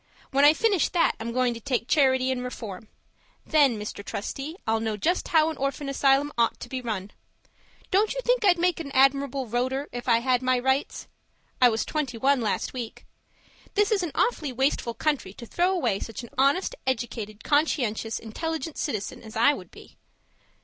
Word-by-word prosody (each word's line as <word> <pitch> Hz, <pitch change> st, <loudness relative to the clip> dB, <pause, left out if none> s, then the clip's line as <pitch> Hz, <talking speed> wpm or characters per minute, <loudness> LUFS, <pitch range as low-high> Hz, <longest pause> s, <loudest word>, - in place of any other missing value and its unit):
When 275 Hz, +1 st, +3 dB
I 295 Hz, +2 st, +7 dB
finish 410 Hz, -3 st, +2 dB
that 345 Hz, -, +3 dB
I'm 230 Hz, +1 st, -4 dB
going 250 Hz, 0 st, +1 dB
to 230 Hz, -, -8 dB
take 245 Hz, 0 st, -2 dB
Charity 260 Hz, -3 st, +3 dB
and 250 Hz, -1 st, -2 dB
Reform; 220 Hz, -5 st, -7 dB, 0.6 s
then, 285 Hz, -7 st, +3 dB
Mr. 210 Hz, -1 st, -6 dB
Trustee, 270 Hz, +11 st, -5 dB
I'll 225 Hz, 0 st, +1 dB
know 220 Hz, -1 st, -2 dB
just 350 Hz, -, 0 dB
how 320 Hz, -1 st, +3 dB
an 315 Hz, -, -8 dB
orphan 275 Hz, +1 st, -2 dB
asylum 275 Hz, +1 st, +2 dB
ought 230 Hz, -, +2 dB
to 240 Hz, -, -7 dB
be 260 Hz, 0 st, -4 dB
run. 210 Hz, -4 st, -4 dB, 0.8 s
Don't 410 Hz, +3 st, +3 dB
you -, -, -2 dB
think -, -, +1 dB
I'd 370 Hz, -3 st, +5 dB
make 350 Hz, 0 st, +1 dB
an 310 Hz, -4 st, -5 dB
admirable 275 Hz, 0 st, +3 dB
voter 255 Hz, +5 st, -2 dB
if 245 Hz, +1 st, -5 dB
I 230 Hz, -, +6 dB
had 250 Hz, 0 st, +2 dB
my 255 Hz, 0 st, +2 dB
rights? 265 Hz, +3 st, -1 dB, 0.5 s
I 250 Hz, -, +8 dB
was 225 Hz, -1 st, -1 dB
twenty 280 Hz, -6 st, -3 dB
one 270 Hz, +2 st, +2 dB
last 215 Hz, -3 st, -1 dB
week. 240 Hz, -3 st, -7 dB, 0.7 s
This 415 Hz, 0 st, +3 dB
is 415 Hz, -3 st, +2 dB
an 345 Hz, -4 st, -3 dB
awfully 310 Hz, -, 0 dB
wasteful 255 Hz, -2 st, 0 dB
country 285 Hz, -9 st, -1 dB
to 235 Hz, -, -10 dB
throw 350 Hz, +9 st, +1 dB
away 245 Hz, -, 0 dB
such 225 Hz, +2 st, -7 dB
an 235 Hz, -, -11 dB
honest, 275 Hz, -, +2 dB
educated, 225 Hz, -4 st, -3 dB
conscientious, 245 Hz, -7 st, +1 dB
intelligent 320 Hz, +6 st, -5 dB
citizen 215 Hz, -8 st, -3 dB
as 220 Hz, -1 st, -12 dB
I 235 Hz, +6 st, +5 dB
would 180 Hz, -10 st, -9 dB
be. -, -, -16 dB
260 Hz, 185 wpm, -26 LUFS, 230-300 Hz, 0.8 s, I